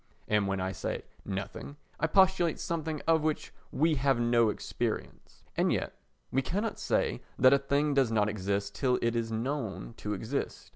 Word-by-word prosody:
And 105 -2 +2
when 95 0 -1
I 95 0 -1
say - - -4 0.2
"nothing" 100 +8 -5 0.2
I 165 - +2
postulate 185 -1 +4
something 160 -2 -3
of 165 -1 +4
which 155 0 -2 0.2
we 160 +3 +2
have 135 -1 +2
no 120 -1 +4
experience. - - -4
And - - +2
yet - - -1 0.4
we 135 - +2
cannot 205 - -2
say - - 0 0.2
that 130 +2 +7
a 140 - +5
thing 140 +2 +1
does 135 -4 +3
not 105 -2 +3
exist 100 -1 -2
till 125 -2 +1
it 115 0 +1
is 115 -1 -1
known 115 -1 -3
to 105 - -3
exist. 115 +8 -4
130 Hz, 175 wpm, -30 LUFS, 105-150 Hz, 0.4 s, that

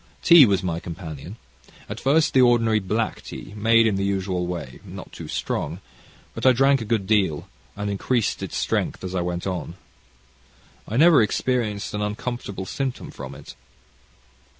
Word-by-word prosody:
Tea 170 -6 +9
was 100 -1 +1
my 85 -2 -2
companion 85 +2 -8 0.5
at - - -6
first 150 +4 +2
the 130 - +5
ordinary 115 -3 +4
black 105 +3 -2
tea, - - -9
made 115 +2 +4
in 105 -3 +1
the 100 - -1
usual 95 -2 -1
way, 85 -8 -6
not - - -10
too - - -9
strong: 80 +5 -3 0.5
but - - -7
I 130 - +6
drank 135 +1 +3
a - - -4
good 110 -3 0
deal, 95 -7 +1 0.3
and 105 0 -4
increased 100 +3 -1
its - - -4
strength - - -1
as 95 0 -5
I 90 - 0
went 90 0 -3
on. 90 -3 -4 1.1
I 110 - -3
never 160 -2 +7
experienced 110 -2 -1
an 105 - -2
uncomfortable 105 -2 -4
symptom 130 +5 -4
from - - -8
it. - - -11
105 Hz, 165 wpm, -23 LUFS, 95-120 Hz, 1.1 s, Tea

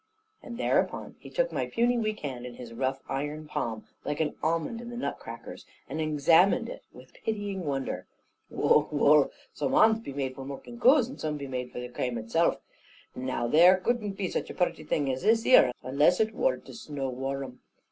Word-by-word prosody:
And 235 -2 -8
thereupon - - 0
he - - -11
took - - 0
my - - -2
puny 240 +1 +2
weak 215 -2 -1
hand 130 -4 -5
in 120 - -9
his 120 -2 -9
rough 130 +2 -2
iron 145 +3 -3
palm, 115 -7 -3 0.2
like 145 - -3
an 155 -2 0
almond 165 +8 -1
in 240 - -8
the 240 - -7
nut 245 - -3
crackers, - - -9 0.2
and 160 - -3
examined 160 +5 +4
it - - -8
with - - -15
pitying 205 -4 -3
wonder. 135 -2 -3 0.4
"Wull, 150 - +3
wull! 145 0 +5 0.2
some 140 - -2
hands 220 0 +5
be 225 - -7
made 135 -1 -3
for 135 - -8
mulking 140 - -8
coos, 255 0 +5
and 265 - -10
some 150 -1 -2
be 140 - -6
made 125 -2 -4
of 125 0 -7
the - - -5
crame 125 0 -3
itself. 115 +10 +1 0.6
Now 130 -2 -2
there 175 +9 +6
couldn't 210 +1 -1
be 195 -1 -2
such - - -3
a - - -7
purty 175 -3 0
thing 145 -2 0
as 130 0 -3
this 225 +1 +3
ere, 130 - +7
unless 145 +7 +3
it 220 0 +1
wor - - +1
to - - -13
snow 145 - -5
war'rm. 135 0 -4
150 Hz, 200 wpm, -28 LUFS, 135-215 Hz, 0.6 s, ere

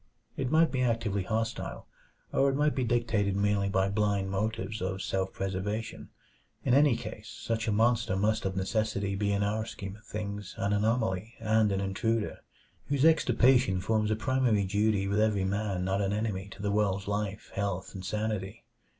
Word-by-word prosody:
It 130 -2 -2
might 160 +2 +4
be 130 - 0
actively 115 -5 0
hostile, 115 +4 -3 0.5
or 140 - +4
it 135 - 0
might 150 +1 +2
be 130 - 0
dictated 115 -4 +1
merely 100 0 +1
by 95 0 +2
blind 100 -2 0
motives 105 0 -2
of 95 +1 -2
self 95 -1 -1
preservation. 100 +3 -4 0.6
In 125 - +3
any 140 -2 +5
case 110 -1 -8
such 115 0 -3
a - - +2
monster 115 -1 +2
must 105 +3 +1
of 95 -1 -2
necessity 100 0 -1
be 100 +1 0
in 100 0 +1
our 105 +2 0
scheme 100 -3 -7
of 105 - -21
things 105 -2 -5
an 100 +1 0
anomaly 110 0 0
and 110 -1 +2
an 95 0 0
intruder, 105 +3 -1 0.5
whose 140 0 +2
extirpation 130 -9 +4
forms 105 +3 +1
a 110 - +2
primary 120 -2 +2
duty 105 0 +1
with 100 +1 +1
every 105 -3 +2
man 100 -2 -1
not 95 +1 0
an 100 0 0
enemy 105 -3 -2
to 100 - -10
the 100 - 0
world's 100 -1 0
life, 105 -1 -3
health, 100 -2 -3
and 95 -2 -7
sanity. 105 0 -3
105 Hz, 175 wpm, -29 LUFS, 100-115 Hz, 0.6 s, any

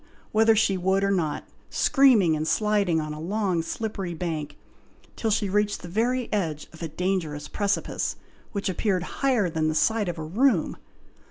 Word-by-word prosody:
whether 220 +1 +4
she 205 -3 +2
would 190 +2 +1
or 200 - +2
not, 160 -6 -1 0.2
screaming 245 - +4
and 155 +1 -2
sliding 200 -1 +2
on 155 -1 -4
a 150 - -7
long 185 0 0
slippery 195 -1 -4
bank, 155 -3 -4 0.6
till 225 - -1
she 210 -1 +1
reached 210 0 0
the - - -6
very 235 +6 0
edge 160 -8 -2
of 160 - -13
a 165 - -2
dangerous 160 -3 -2
precipice, 200 -1 -1 0.4
which 200 -3 -3
appeared 190 -1 0 0.2
higher 255 -8 +3
than 160 -2 -1
the 155 - 0
side 220 +1 +2
of 175 - -4
a 160 - -5
room. 200 - +1
190 Hz, 170 wpm, -25 LUFS, 160-215 Hz, 0.6 s, whether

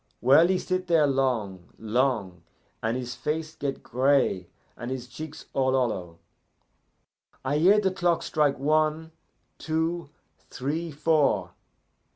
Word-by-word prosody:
Well, 140 +7 +6
he 185 0 +2
sit 185 0 -2
there 165 -3 +4
long 120 -10 -1
long, 110 -6 -1 0.4
and 115 +3 -1
his 125 -1 -5
face 155 +5 -3
get 140 -1 -4
gray 130 -8 +1 0.3
and 120 - -6
his 130 -1 -5
cheeks 155 +3 -9
all 130 -1 +1
hollow. 95 -10 -1 1.3
"I 145 +3 +1
hear 195 +6 +6
the 195 -2 +1
clock 175 -2 +1
strike 150 -3 +1
one! 155 +3 +1 0.5
two! 160 0 -2 0.4
three! 155 +6 -3
four! 150 0 +1
140 Hz, 125 wpm, -26 LUFS, 125-160 Hz, 1.3 s, Well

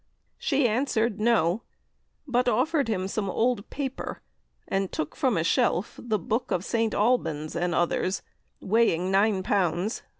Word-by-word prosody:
She 275 -3 +2
answered, 230 -2 0
No! 215 -4 +2 0.7
but 250 -1 +1
offered 275 +5 +1
him 190 -4 -1
some 200 0 -2
old 230 +1 0
paper, 270 -2 -5 0.4
and 195 -1 -1
took 155 -1 -3
from 250 -8 +1
a 165 - +1
shelf 175 +3 +1
the 220 -3 0
'Boke 220 +6 -2
of 180 +2 -1
St. 225 -2 0
Albans' 200 -9 0
and 175 0 0
others, 185 +2 0 0.4
weighing 190 -4 +2
9 195 0 +3
lbs. 185 +2 0
215 Hz, 140 wpm, -26 LUFS, 185-240 Hz, 0.7 s, 9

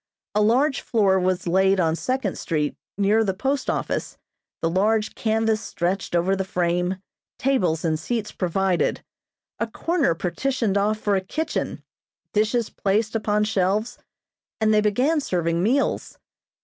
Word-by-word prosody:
A 210 - +2
large 260 +7 +3
floor 195 -5 +2
was 185 -1 0
laid 190 +2 +3
on 165 -2 +2
Second 255 0 -2
street 150 -3 -1 0.2
near 205 +3 +3
the 190 -3 -1
post 270 +6 -1
office, - - -2 0.4
the 165 - 0
large 210 +5 +1
canvas 220 -1 +1
stretched 180 -1 -2
over 180 +3 +2
the 190 - -1
frame, 180 0 0 0.4
tables 180 - +1
and 155 -1 +1
seats 215 +5 -3
provided, 185 0 0 0.6
a 230 - 0
corner 300 - 0
partitioned 215 +4 -1
off 210 +2 +2
for 205 -1 0
a 190 - +1
kitchen, 315 +12 -3 0.5
dishes 220 +2 +1
placed 215 +3 0
upon 210 -1 +1
shelves, 210 +1 0 0.6
and 220 0 +3
they 210 - +4
began 255 +10 +2
serving 170 - 0
meals. 250 +9 0
205 Hz, 140 wpm, -23 LUFS, 185-225 Hz, 0.6 s, they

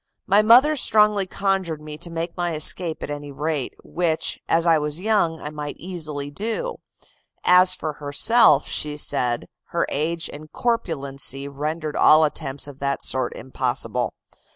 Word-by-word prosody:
My 200 +2 +4
mother 250 +8 +6
strongly 210 -6 +3
conjured 190 -5 -1
me 150 0 -8
to 170 - -6
make 165 +1 -4
my 175 -2 -2
escape 160 +2 +1
at - - -5
any 145 0 -6
rate, 150 -1 -3
which, 165 -2 -1
as 165 +1 +2
I 165 -2 +4
was 150 +1 -3
young, 185 -6 +1
I 150 - -6
might 150 -1 -6
easily 155 -6 -5
do; 230 - -3 0.7
as 180 0 +5
for 155 -1 -4
herself, 145 - +4
she 150 -1 0
said, 120 -4 0 0.2
her - - -1
age 165 +3 -1
and 155 +1 -11
corpulency 140 - -1
rendered 150 +2 -4
all 155 +1 +6
attempts 140 -2 -2
of 140 -1 -11
that 140 0 -2
sort 130 0 -1
impossible. 125 -2 -2
155 Hz, 150 wpm, -22 LUFS, 145-180 Hz, 0.7 s, mother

